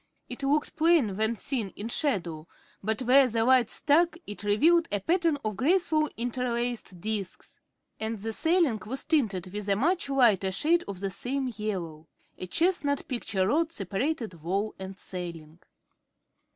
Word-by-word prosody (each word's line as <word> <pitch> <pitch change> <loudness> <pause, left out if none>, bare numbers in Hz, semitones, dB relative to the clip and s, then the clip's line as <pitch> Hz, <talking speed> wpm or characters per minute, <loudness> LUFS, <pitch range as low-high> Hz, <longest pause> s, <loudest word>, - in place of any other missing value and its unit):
It 250 +2 -8
looked 290 +2 0
plain 315 - +3
when 220 +3 +1
seen 230 -1 -2
in 210 - -5
shadow, 175 - -2 0.3
but 220 +5 -1
where 260 +2 +6
the 225 -1 0
light 255 -3 +4
struck 330 +3 +2
it 205 - -8
revealed 320 +12 +4
a 205 - 0
pattern 335 - +1
of 215 -1 -1
graceful 310 - +2
interlaced 240 -4 -2
disks. 205 -1 -4 0.4
And 220 +1 -2
the 220 +2 -4
ceiling 320 - +2
was 265 +4 -4
tinted 200 - 0
with 210 0 -4
a 200 - +3
much 320 - 0
lighter 220 -8 +3
shade 335 - +2
of 195 -2 -6
the 195 -1 -2
same 255 +5 -2
yellow. 175 -7 -4 0.3
A 185 - -5
chestnut 310 - +1
picture 220 -8 -1
rod 320 +7 +1
separated 210 - -2
wall 195 +6 -1
and 190 0 -7
ceiling. 170 -4 -7
230 Hz, 150 wpm, -28 LUFS, 195-290 Hz, 0.4 s, where